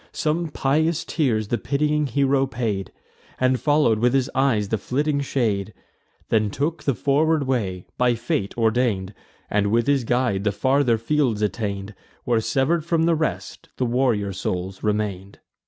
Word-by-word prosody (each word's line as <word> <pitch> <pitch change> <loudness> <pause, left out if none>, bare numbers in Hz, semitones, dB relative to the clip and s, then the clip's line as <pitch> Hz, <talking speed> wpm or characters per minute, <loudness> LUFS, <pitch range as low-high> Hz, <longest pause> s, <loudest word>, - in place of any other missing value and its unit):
Some 165 +2 -1
pious 155 +4 0
tears 110 -9 0
the 120 - 0
pitying 150 +1 0
hero 135 +1 +2
paid, 115 -6 -3 0.5
And 130 0 +2
follow'd 145 -7 +3
with 125 +3 +2
his 130 -2 +1
eyes 120 -7 +1
the 110 - 0
flitting 145 +6 -1
shade, 110 -7 -1 0.5
Then 110 -2 +2
took 145 +10 -2
the 140 - +1
forward 145 +8 +2
way, 100 -9 -2
by 125 -1 +3
fate 115 -3 -2
ordain'd, 110 -4 +1 0.3
And, 105 -1 +1
with 115 +3 +2
his 140 -2 +2
guide, 120 -5 0
the 105 - +1
farther 130 +2 +2
fields 115 -3 0
attain'd, 100 -2 -3 0.3
Where, 115 -2 +1
sever'd 145 +8 +1
from 165 0 +1
the 170 0 +3
rest, 160 -1 -3
the 130 - 0
warrior 120 -5 +1
souls 95 +1 -4
remain'd. 105 -2 -2
125 Hz, 155 wpm, -23 LUFS, 105-140 Hz, 0.5 s, follow'd